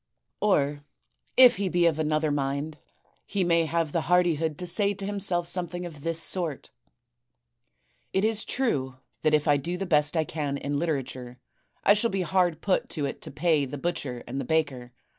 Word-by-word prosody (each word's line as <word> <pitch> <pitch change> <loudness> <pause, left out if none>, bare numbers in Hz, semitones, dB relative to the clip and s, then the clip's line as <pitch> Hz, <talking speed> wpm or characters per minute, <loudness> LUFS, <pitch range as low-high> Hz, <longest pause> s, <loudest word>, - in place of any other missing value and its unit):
* - - -50
Or 145 -5 +1 0.5
if 250 -1 +8
he 195 -1 -1
be 175 -1 +2
of 160 -2 +2
another 155 0 +1
mind, 145 +2 -2 0.4
he 200 -2 -1
may 170 -1 +3
have 165 -1 -1
the - - 0
hardihood 165 -4 +2
to 180 - -5
say 200 +3 0
to 195 0 -4
himself 195 -4 -1
something 175 0 -3
of 155 -5 -9
this 165 +1 0
sort: 165 -3 -1 1.4
*It 190 +2 +1
is 220 0 +1
true 140 - -1 0.3
that 155 0 +3
if 150 +1 0
I 145 -1 +5
do 170 +6 -3
the 195 - -3
best 150 -2 +2
I 160 - +3
can 145 -3 -3
in 140 0 -2
literature, 130 -6 -3 0.5
I 200 - +6
shall 210 +3 +1
be 195 -2 -1
hard 175 -3 +1
put 190 -2 0
to 150 -5 -2
it - - -5
to - - -5
pay 150 0 +1
the 135 +2 -6
butcher 135 -6 -3
and 135 +3 -3
the - - -5
baker. 140 -6 -1
160 Hz, 190 wpm, -27 LUFS, 145-180 Hz, 1.4 s, if